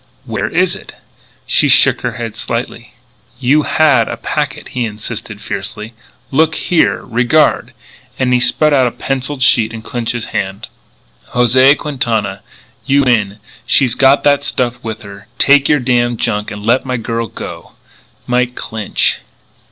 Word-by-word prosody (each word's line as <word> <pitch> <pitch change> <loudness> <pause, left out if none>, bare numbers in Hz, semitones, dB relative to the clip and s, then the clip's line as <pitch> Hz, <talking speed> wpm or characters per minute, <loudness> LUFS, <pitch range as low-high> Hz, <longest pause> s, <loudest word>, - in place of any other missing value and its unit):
"Where - - -3
is - - +1
it?" - - -12 0.5
She - - +3
shook - - +5
her - - -2
head - - -6
slightly. - - -5 0.4
"You 135 +4 +3
had 145 -7 +3
a - - -4
packet," - - -3
he 125 - -2
insisted 110 0 -6
fiercely. 105 +3 -5 0.4
"Look 160 +3 +2
here! 175 -3 +1
Regard!" 125 +5 +1 0.5
and 125 -1 +1
he 125 - +4
spread 150 +4 +2
out 130 -3 +4
a - - -2
penciled 135 +1 -3
sheet 115 -4 +3
in 115 -1 -8
Clinch's 120 -1 -3
hand: 95 +3 -4 0.7
"José 130 +4 +5
Quintana: 110 -9 -2 0.4
"You 140 +1 +2
win. 105 -6 +1 0.3
She's 130 -4 +3
got 135 +1 +4
that 145 -1 +3
stuff 120 -2 0
with 110 0 -6
her. 100 -1 -12
Take 140 0 +4
your 150 - +4
damn 120 -1 +1
junk 105 -2 -2
and 105 0 -8
let 120 +3 +2
my 130 -1 -2
girl 115 0 -3
go. - - -9 0.5
"MIKE 125 0 0
CLINCH." 110 -2 -1
125 Hz, 150 wpm, -15 LUFS, 110-135 Hz, 0.7 s, shook